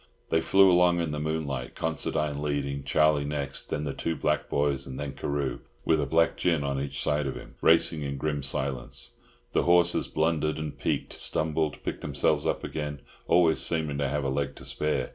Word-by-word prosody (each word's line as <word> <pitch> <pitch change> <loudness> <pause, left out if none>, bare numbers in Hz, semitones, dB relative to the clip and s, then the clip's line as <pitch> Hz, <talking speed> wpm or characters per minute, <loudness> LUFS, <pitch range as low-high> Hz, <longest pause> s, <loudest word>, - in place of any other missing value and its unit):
They 80 - +3
flew 95 +1 +5
along 90 0 +4
in 85 -2 -1
the 75 - -3
moonlight, 75 -5 -3
Considine 75 -2 -1
leading, 70 -2 -2
Charlie 75 +1 +3
next, 70 -1 -3
then 75 - -2
the 70 -2 -3
two 80 - -2
black 70 - 0
boys, 70 -2 +1
and 65 -1 -7
then 70 -1 -3
Carew, 70 -4 -2 0.3
with 80 -2 +3
a 70 - -1
black 80 +3 +2
gin 85 -5 +1
on 70 -1 -1
each 70 0 -4
side 75 -1 0
of 65 - -3
him, - - -10
racing 80 -1 +4
in 70 -1 -3
grim 75 0 -1
silence. 70 -2 -3 0.4
The - - +2
horses 85 0 +3
blundered 80 -1 0
and 75 -1 -4
"peeked," - - -2
stumbled, 80 -1 -1
picked - - -4
themselves 70 -3 +1
up - - -1
again, 75 -2 -4 0.3
always 85 -2 +4
seeming 80 -4 0
to 70 -1 0
have 75 0 -1
a 70 - 0
leg 70 +1 -2
to - - -12
spare. 75 0 -1
75 Hz, 195 wpm, -28 LUFS, 70-80 Hz, 0.4 s, flew